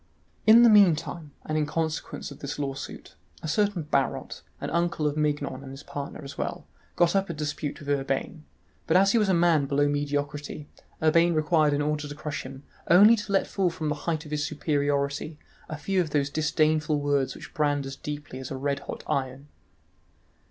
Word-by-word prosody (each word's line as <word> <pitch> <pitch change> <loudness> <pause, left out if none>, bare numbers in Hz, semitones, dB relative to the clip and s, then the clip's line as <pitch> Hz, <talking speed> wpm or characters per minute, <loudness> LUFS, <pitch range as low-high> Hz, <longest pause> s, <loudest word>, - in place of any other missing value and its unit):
In 230 +2 +9
the 235 - +8
meantime, 175 -6 +4 0.2
and 155 - -2
in 150 - 0
consequence 160 -1 -3
of 140 - -11
this 145 +1 -5
lawsuit, 135 -1 -6 0.3
a - - -3
certain 200 +2 +1
Barot, 140 -2 -1 0.2
an - - -4
uncle 170 -2 0
of 150 -1 +1
Mignon 145 -3 -1
and 135 - -9
his 135 +2 -10
partner 145 +1 -7
as 140 0 -9
well, - - -3 0.3
got 175 +2 +3
up 195 -1 +1
a 170 - -4
dispute 150 0 -4
with 145 - -11
Urbain, 140 +3 -2 0.4
but 165 - +4
as 195 +1 +5
he 230 - +3
was 210 -2 +2
a - - +4
man 170 -4 +3
below 145 +1 +2
mediocrity, 145 +1 -3 0.4
Urbain 165 +2 +4
required 155 -1 +3
in 145 - 0
order 150 0 -1
to 145 - -7
crush 150 -1 -4
him 135 +1 -10 0.3
only 205 +6 +8
to 210 -2 -6
let 195 - +3
fall 190 -3 0
from 165 -3 -4
the - - +1 0.2
height 160 -1 -1
of 150 - -11
his 150 -1 -1
superiority 145 0 -1 0.3
a 155 - -4
few 185 +5 0
of 165 - -3
those 145 -1 0
disdainful 155 0 +1
words 145 -2 0
which - - -11
brand 145 -2 +1
as 135 0 -6
deeply 145 -3 -7
as 130 - -7
a 135 - -4
red 140 +1 -1
hot - - -8
iron. 135 +1 -3
150 Hz, 195 wpm, -27 LUFS, 145-165 Hz, 0.4 s, In